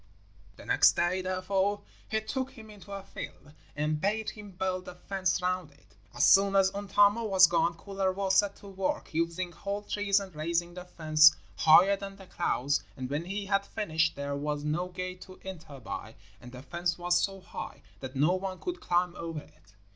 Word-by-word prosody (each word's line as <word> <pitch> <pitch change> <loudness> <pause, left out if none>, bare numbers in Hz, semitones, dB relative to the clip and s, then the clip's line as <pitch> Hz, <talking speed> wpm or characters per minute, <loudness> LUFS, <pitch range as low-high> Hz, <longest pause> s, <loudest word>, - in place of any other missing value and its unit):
The - - -13
next - - +5
day, 175 +2 +1
therefore, 190 +2 0 0.3
he 220 0 0
took 260 +4 -3
him 225 -5 -13
into 205 -1 -13
a 195 -1 -5
field 145 -5 -9 0.2
and 150 +1 -1
bade 215 +3 0
him 210 -1 -11
build 185 0 -3
a - - -8
fence 185 -1 -1
round 180 -3 -1
it. 140 -6 -25 0.2
As - - +4
soon 195 0 +6
as 195 -1 +5
Untamo 205 +2 +3
was 190 -3 +7
gone, 170 0 +1
Kullervo 195 +1 -1
set 200 +1 +3
to 200 - -14
work, 195 -3 -3
using 170 +2 -1
whole 200 +4 -4
trees 205 -1 +1
and 195 -2 -8
raising 170 +3 -1
the 180 0 -8
fence 155 -3 +5 0.2
higher 180 +5 +6
than 195 0 -7
the 195 -1 -13
clouds; 145 -6 0
and 130 0 -5
when 150 +4 -2
he 200 +2 -4
had 200 0 +1
finished 165 -5 0
there 140 0 -3
was 145 +1 -2
no 155 +4 -1
gate 185 0 -6
to 185 -1 -12
enter 160 -7 -8
by, 110 -1 -7 0.3
and 125 - -11
the 125 +1 -10
fence 170 +2 -2
was 175 0 +2
so 195 -1 -2
high 185 - -8 0.2
that 130 0 -7
no 150 +6 +3
one 185 0 -3
could 360 -2 -5
climb 175 0 +1
over 165 -2 -5
it. 95 - -22
185 Hz, 190 wpm, -29 LUFS, 160-195 Hz, 0.3 s, was